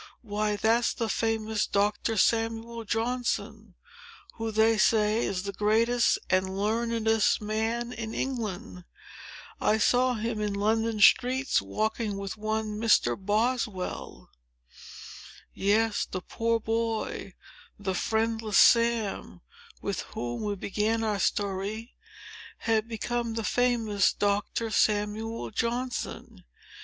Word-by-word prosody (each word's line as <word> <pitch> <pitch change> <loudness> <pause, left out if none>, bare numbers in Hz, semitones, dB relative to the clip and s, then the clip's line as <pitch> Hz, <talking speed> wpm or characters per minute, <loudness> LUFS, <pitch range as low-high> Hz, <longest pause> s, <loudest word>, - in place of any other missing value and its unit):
"Why, 210 -1 -1
that's 225 +3 +2
the 230 - -2
famous 220 0 0
Doctor 210 +2 0
Samuel 230 +2 0
Johnson, 240 +3 -2 0.6
who, 225 -1 -4
they 220 0 +3
say, 215 +1 +3
is 185 -1 -2
the 200 0 -4
greatest 230 +4 +2
and 185 0 +1
learnedest 225 +1 +1
man 225 +3 -2
in 225 -2 -5
England. 220 -7 -4 0.8
I 215 - +3
saw 250 +3 +3
him 220 0 -3
in 205 -1 -1
London 220 +2 0
Streets, 255 +5 +4
walking 215 -1 -2
with 195 -1 -5
one 215 0 -3
Mr. 210 - +3
Boswell." 210 -1 -2 1.2
Yes; 210 +2 +1
the 185 - -4
poor 230 +5 -1
boy—the 220 -3 -4
friendless 220 +1 0
Sam—with, 235 - +1
whom 120 0 -3
we 205 -1 -2
began 215 +3 -1
our 210 -2 0
story, 205 +4 -2 0.6
had 225 -1 0
become 235 0 -3
the 225 - -2
famous 225 -5 +2
Doctor 205 +2 -1
Samuel 215 +2 0
Johnson! 240 +3 -3
220 Hz, 105 wpm, -28 LUFS, 210-230 Hz, 1.2 s, Streets